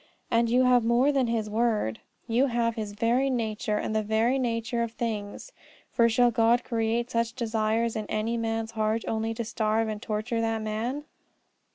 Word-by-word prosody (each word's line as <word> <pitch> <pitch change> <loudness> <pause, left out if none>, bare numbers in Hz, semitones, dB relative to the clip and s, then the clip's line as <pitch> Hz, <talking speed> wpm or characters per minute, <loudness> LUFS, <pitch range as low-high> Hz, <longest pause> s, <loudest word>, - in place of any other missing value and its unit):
And 230 0 +3
you 250 +2 +4
have 250 -2 +4
more 240 +5 +3
than 270 -3 +1
His 230 -2 -1
word: 215 - 0 0.3
you 245 +4 +2
have 235 -2 0
His 215 -2 -5
very 235 +5 +1
nature, 220 -3 -1
and 215 - -2
the 215 - +2
very 220 +5 +1
nature 235 -1 -1
of 230 -1 -2
things. 220 - -4 0.4
For 235 0 +4
shall 245 +1 +4
God 230 +1 +3
create 230 +1 -1
such 230 0 0
desires 225 -1 0
in 215 -1 -3
any 220 +2 -1
man's 225 -1 -2
heart 220 0 0
only 225 0 -1
to 235 0 -3
starve 220 0 0
and 210 -1 -5
torture 225 +2 -2
that 225 -1 -1
man? 230 +7 -3
230 Hz, 180 wpm, -27 LUFS, 220-235 Hz, 0.4 s, you